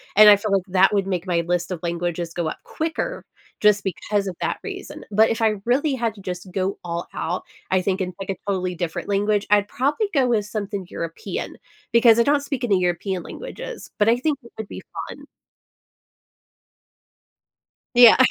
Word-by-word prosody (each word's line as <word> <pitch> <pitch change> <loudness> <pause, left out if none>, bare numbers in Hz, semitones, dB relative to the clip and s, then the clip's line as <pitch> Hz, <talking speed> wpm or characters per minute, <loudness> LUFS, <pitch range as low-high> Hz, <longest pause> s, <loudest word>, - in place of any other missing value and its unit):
and 210 +1 +9
I 205 - +10
feel 205 +1 -3
like 195 -2 +2
that 190 +2 +4
would 200 -2 +2
make 185 -1 -2
my 170 -2 +2
list 175 -1 0
of 180 - -3
languages 170 0 -2
go 170 -2 -2
up - - -4
quicker 330 +10 -3 0.4
just 210 -1 +4
because 200 +2 -1
of 185 - -4
that - - -1
reason. - - -7
But 215 +2 +5
if 225 - -1
I 220 -1 +3
really 275 +5 +2
had 230 -3 -1
to 200 - -12
just 180 0 -6
go 190 +1 -2
all 170 0 -4
out, 180 +3 -2 0.3
I 190 - +4
think, 190 +1 0
in, 185 -1 -2
like, 195 - -6
a - - -3
totally 185 -2 -1
different 170 -1 -4
language, 205 +1 +1
I'd 205 -1 +4
probably 290 - 0
go 265 -3 +4
with 220 -4 +1
something 205 -2 -4
European, 165 0 -5 0.4
because 235 -1 +7
I - - +6
don't 285 +3 +3
speak 275 -3 -4
any 200 -6 +3
European 180 +1 -1
languages, - - -8
but 210 +1 +4
I 235 - +4
think 285 +2 -1
it 235 - -15
would 220 - -5
be - - -8 0.3
fun. - - -10 2.7
Yeah. 240 -2 +9
200 Hz, 190 wpm, -23 LUFS, 180-235 Hz, 2.7 s, I